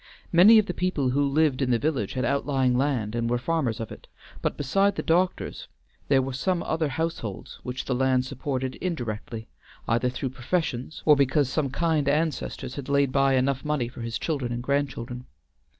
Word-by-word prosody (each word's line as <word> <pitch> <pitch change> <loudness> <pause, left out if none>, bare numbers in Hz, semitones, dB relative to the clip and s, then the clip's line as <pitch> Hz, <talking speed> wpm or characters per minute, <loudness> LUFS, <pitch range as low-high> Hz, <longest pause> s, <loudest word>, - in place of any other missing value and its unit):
Many 190 +7 +8
of 215 - +5
the 180 - -3
people 165 -9 0
who 140 +2 +2
lived 140 -1 +2
in 130 - +1
the 120 - +4
village 135 -6 -1
had 130 -1 -1
outlying 135 -1 +1
land 125 -5 0
and 115 0 -1
were 120 - +2
farmers 130 -4 -1
of 115 - -5
it, - - -11 0.3
but - - -1
beside 195 +8 +2
the - - -3
doctor's 180 +3 0 0.4
there 135 -2 +4
were 135 0 -4
some 175 +7 0
other 160 -1 0
households 145 - -4
which 125 +1 -5
the 130 - -1
land 130 0 +2
supported 130 -1 -3
indirectly, 115 - -4 0.4
either 120 +2 +2
through 130 +1 -3
professions 130 +1 -3
or 150 - +7
because 140 0 +2
some 150 -4 0
kind 150 0 +1
ancestor 150 -3 -1
had 135 +1 -7
laid 140 -1 +3
by 135 0 +3
enough 130 +1 +1
money 150 -5 0
for 120 0 -9
his 115 0 -3
children 140 -7 -2
and 120 0 -3
grandchildren. 130 -3 -2
135 Hz, 185 wpm, -26 LUFS, 125-155 Hz, 0.4 s, Many